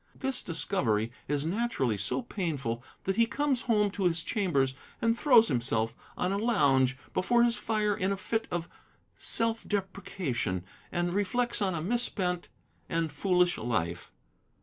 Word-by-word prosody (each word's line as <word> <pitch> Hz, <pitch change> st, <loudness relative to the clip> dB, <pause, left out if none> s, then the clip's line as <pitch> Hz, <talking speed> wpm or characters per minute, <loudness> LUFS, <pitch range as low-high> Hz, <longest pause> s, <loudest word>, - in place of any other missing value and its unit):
This 265 Hz, -2 st, 0 dB
discovery 115 Hz, -, 0 dB, 0.2 s
is 145 Hz, +1 st, 0 dB
naturally 180 Hz, -, 0 dB
so 100 Hz, -, 0 dB
painful 145 Hz, -, -3 dB, 0.2 s
that 195 Hz, +2 st, -1 dB
he 230 Hz, 0 st, +5 dB
comes 280 Hz, -1 st, 0 dB
home 210 Hz, -4 st, +2 dB
to 195 Hz, -1 st, -2 dB
his 165 Hz, -1 st, +1 dB
chambers 160 Hz, -, +1 dB, 0.3 s
and 230 Hz, 0 st, +2 dB
throws 235 Hz, -4 st, +6 dB
himself 115 Hz, -3 st, 0 dB, 0.2 s
on 180 Hz, -, 0 dB
a 200 Hz, -, 0 dB
lounge 135 Hz, -, +3 dB, 0.2 s
before 235 Hz, +6 st, +3 dB
his 235 Hz, -1 st, +3 dB
fire 215 Hz, -3 st, 0 dB
in 190 Hz, +1 st, 0 dB
a 200 Hz, -, -1 dB
fit 225 Hz, +3 st, -2 dB
of 175 Hz, -1 st, -2 dB, 0.5 s
self 230 Hz, 0 st, 0 dB
deprecation, 185 Hz, -, -2 dB, 0.3 s
and 175 Hz, 0 st, 0 dB
reflects 240 Hz, +5 st, 0 dB
on 190 Hz, -3 st, +1 dB
a 155 Hz, -, -3 dB
misspent 185 Hz, -4 st, 0 dB, 0.4 s
and 165 Hz, -2 st, 0 dB
foolish 180 Hz, +3 st, +2 dB
life. 90 Hz, -7 st, -2 dB
185 Hz, 150 wpm, -29 LUFS, 135-225 Hz, 0.5 s, throws